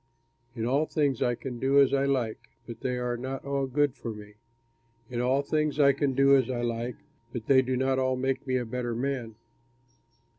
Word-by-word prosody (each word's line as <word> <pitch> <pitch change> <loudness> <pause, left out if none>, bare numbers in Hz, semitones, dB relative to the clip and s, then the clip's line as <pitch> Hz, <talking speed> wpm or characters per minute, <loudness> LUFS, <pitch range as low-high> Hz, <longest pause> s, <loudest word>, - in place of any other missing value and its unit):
In 115 -2 -2
all 140 +5 +1
things 140 -5 0
I 120 -2 +2
can 125 -1 -7
do 135 +2 +4
as 140 -1 +5
I 140 0 +2
like, 125 -6 0 0.3
but 115 -1 -9
they 125 -1 -1
are 125 -1 -1
not 130 +3 -5
all 140 -1 -1
good 145 +1 +1
for 125 - -7
me. 105 -1 -10 0.8
In 120 -1 -1
all 130 +3 +2
things 150 0 0
I 140 -1 +6
can 140 0 0
do 140 +1 +6
as 130 -3 +2
I 120 -2 -2
like, 120 +1 -2 0.4
but 120 -3 -5
they 130 0 +5
do 130 0 -1
not 130 +1 +1
all 130 0 +1
make 130 +1 -2
me 130 0 +1
a 125 - -2
better 120 0 -3
man. 125 -3 -3
130 Hz, 210 wpm, -28 LUFS, 120-140 Hz, 0.8 s, I